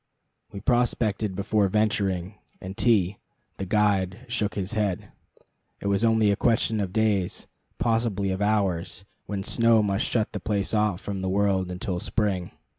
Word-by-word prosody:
We 100 - -7
prospected 110 -4 +1
before 100 +1 +1
venturing, 100 -2 0 0.2
and 95 +1 -7
T, 100 -5 +2 0.4
the 95 - -4
guide, 100 +1 +1
shook 110 -3 -1
his 95 +1 -3
head. 105 -5 -1 0.7
It - - -11
was 100 +2 +1
only 110 -2 +4
a - - +2
question 115 0 +1
of 95 -3 -2
days 105 -4 0 0.3
possibly 115 -4 0
of 95 +1 -3
hours 95 -3 0 0.2
when 100 -1 -3
snow 115 0 +3
must 100 +1 0
shut 110 -3 0
the - - -3
place 100 -1 -1
off 105 -4 +1
from 100 -2 -4
the 95 - -1
world 95 -1 +1
until 90 0 -3
spring. 95 -3 -1
100 Hz, 155 wpm, -26 LUFS, 95-110 Hz, 0.7 s, only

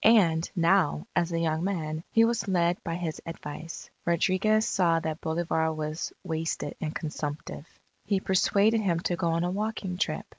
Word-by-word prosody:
And, 175 -8 +5
now, 170 - +3
as 175 0 +1
a 165 - 0
young 160 0 0
man, 160 -5 -2
he 225 0 +6
was 230 -2 0
led 175 -2 +1
by 165 - -2
his 170 -3 -4
advice. 165 0 -7 0.2
Rodriguez 185 +6 +2
saw 170 -4 +3
that 160 -1 -4
Bolivar 160 0 0
was 155 +1 -3
wasted 160 -2 -2
and 155 -1 -3
consumptive. 150 -1 -5 0.4
He 200 -2 +1
persuaded 200 +4 +3
him 175 -5 +1
to 175 - 0
go 170 - -1
on 165 +1 +1
a 175 - 0
walking 200 -2 -3
trip. - - -1
170 Hz, 170 wpm, -28 LUFS, 160-190 Hz, 0.4 s, he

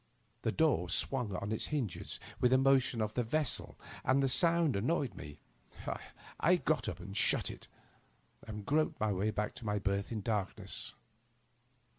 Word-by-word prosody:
The - - +1
door 145 - +2
swung 120 +1 -1
on 100 +3 -3
its 110 - -1
hinges 130 - -3 0.2
with 125 - +4
the 130 - +5
motion 135 -3 +3
of 105 0 -3
the 125 - +1
vessel, 140 +3 -1 0.3
and 135 +2 +3
the - - +4
sound 165 - +4
annoyed 135 +6 0
me. 75 0 -9 1.0
I - - +5
got - - 0
up - - -6
and - - -8
shut - - +3
it, - - -11 0.8
and 105 -2 -6
groped 155 +5 +1
my 110 0 +1
way 100 +3 0
back 105 0 -1
to 115 - -9
my 105 0 +1
berth 100 0 -1
in 115 - -2
the 105 - -4
darkness. 105 -4 -2
115 Hz, 170 wpm, -34 LUFS, 105-135 Hz, 1.0 s, the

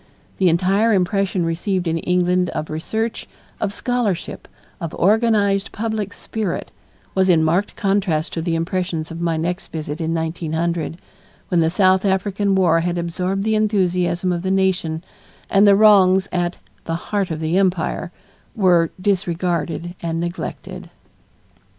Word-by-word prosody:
The 185 -2 +4
entire 195 +7 +2
impression 190 -1 +1
received 175 +2 -1
in 165 0 0
England 180 +1 +1
of 155 - -3
research, 220 +9 -3 0.3
of 195 - -1
scholarship, 235 -5 -2 0.3
of 165 -2 -5
organized 205 -1 +2
public 215 -2 -3
spirit, 215 -6 -4 0.4
was 190 0 +2
in 165 -3 +5
marked 175 +6 +1
contrast 195 -5 0
to 165 - -2
the 165 0 -1
impressions 165 -1 -2
of 165 +1 -6
my 165 -2 0
next 175 +3 -3
visit 155 0 -5
in 160 0 -1
1900, 165 0 -2 0.5
when 175 - +2
the 160 -1 +3
South 185 +1 +3
African 195 0 +1
War 175 -3 +4
had 175 +1 -1
absorbed 180 +3 -2
the 220 +1 +1
enthusiasm 180 -4 +1
of 175 -1 -1
the 190 - -2
nation 185 -4 0 0.5
and 200 +1 +5
the 200 - +7
wrongs 195 -3 +5
at 175 -1 -1 0.3
"the 165 - -2 0.2
heart 200 -3 0
of 160 -2 -3
the 160 +2 -1
empire" 180 -2 0 0.4
were 175 -6 +3
disregarded 175 -3 -1
and 165 -1 -2
neglected. 170 +1 -5
180 Hz, 145 wpm, -20 LUFS, 165-195 Hz, 0.5 s, the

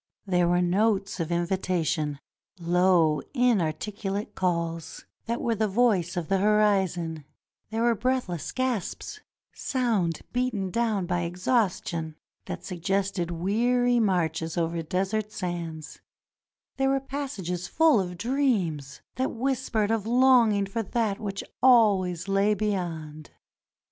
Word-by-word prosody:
There 180 -3 +2
were 175 +1 +2
notes 195 +2 +1
of 165 0 -2
invitation, 170 -4 -1 0.4
low, 175 -2 +3
inarticulate 205 - 0
calls, 170 -3 -2 0.2
that 235 +1 -1
were 235 - 0
the 220 0 0
voice 195 -5 +1
of 170 -3 -2
the 195 -1 +1
horizon; 190 -6 +1 0.5
there 225 +1 -1
were 235 0 +4
breathless 230 - -2
gasps, 255 - -3 0.3
sound 220 - -1
beaten 235 -7 -1
down 220 -3 0
by 175 0 -1
exhaustion, 175 -3 -1 0.3
that - - -6
suggested 190 0 -1
weary 240 +8 +1
marches 165 -5 0
over 170 0 0
desert 195 +6 -2
sands; 170 -5 -5 0.8
there 270 0 +2
were 270 0 +2
passages 215 -11 -4
full 320 -7 +4
of 180 -2 -3
dreams 190 - -1 0.2
that 260 +1 0
whispered 235 -4 -1
of 225 -2 -1
longing 240 -4 +4
for 195 +4 -3
that 220 -1 -1
which 200 -3 -4 0.2
always 200 -8 +4
lay 200 +2 +2
beyond. 165 -7 -3
195 Hz, 120 wpm, -26 LUFS, 175-230 Hz, 0.8 s, were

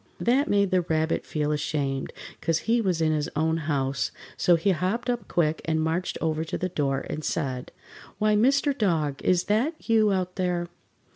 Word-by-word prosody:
That 265 +5 +2
made 200 -1 +2
the 185 -1 +3
Rabbit 160 -1 -1
feel 150 -1 -1
ashamed, 145 -2 -2 0.3
'cause 165 -1 +1
he 235 +1 +3
was 180 -6 0
in 160 -1 +3
his 150 -1 -1
own 160 +1 +1
house, 140 -4 -1 0.2
so 175 - +4
he 170 +4 +2
hopped 195 +8 0
up 240 -5 -4
quick 160 -2 +1
and 160 -1 +1
marched 160 +3 -1
over 160 -1 0
to 160 - -4
the 185 - -2
door 140 -5 -1
and 155 - -5
said: 130 -5 -2 0.5
"Why, 215 0 +2
Mr. 275 +5 +3
Dog, 160 - 0
is 180 -1 +3
that 250 +10 -1
you 220 -2 +4
out 185 -1 -1
there?" 175 -2 -1
170 Hz, 185 wpm, -26 LUFS, 155-205 Hz, 0.5 s, so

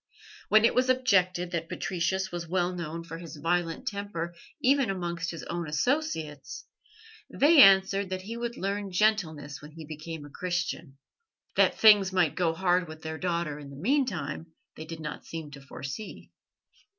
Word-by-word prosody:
When 215 +1 +6
it - - +4
was 255 +1 +2
objected 185 -9 +2
that 165 -2 -3
Patricius 190 +1 -1
was 175 -1 -5
well 180 +1 0
known 170 -1 -5
for 165 0 -8
his 165 -2 -9
violent 165 - -1
temper 200 -6 -4 0.3
even 270 -2 +3
amongst 170 -3 -3
his 165 - -6
own 170 -1 -4
associates, 160 - -2 0.6
they 295 +1 +6
answered 195 -1 +6
that 185 0 -4
he 225 +4 -6
would 235 0 -4
learn 200 0 -3
gentleness 175 -8 0
when 150 0 -12
he 160 0 -9
became 155 0 -7
a - - -11
Christian. 175 -4 -3 0.6
That - - +4
things 205 -3 +7
might 180 -6 +2
go 175 -2 +1
hard 180 0 +2
with 155 0 -11
their 160 0 -5
daughter 170 -5 -2
in 145 -1 -10
the 140 - -10
meantime 175 - -1 0.3
they 155 - -8
did 165 0 -8
not 150 -1 -7
seem 160 -3 -6
to 140 -1 -11
foresee. 135 +8 -8
175 Hz, 165 wpm, -28 LUFS, 160-200 Hz, 0.6 s, things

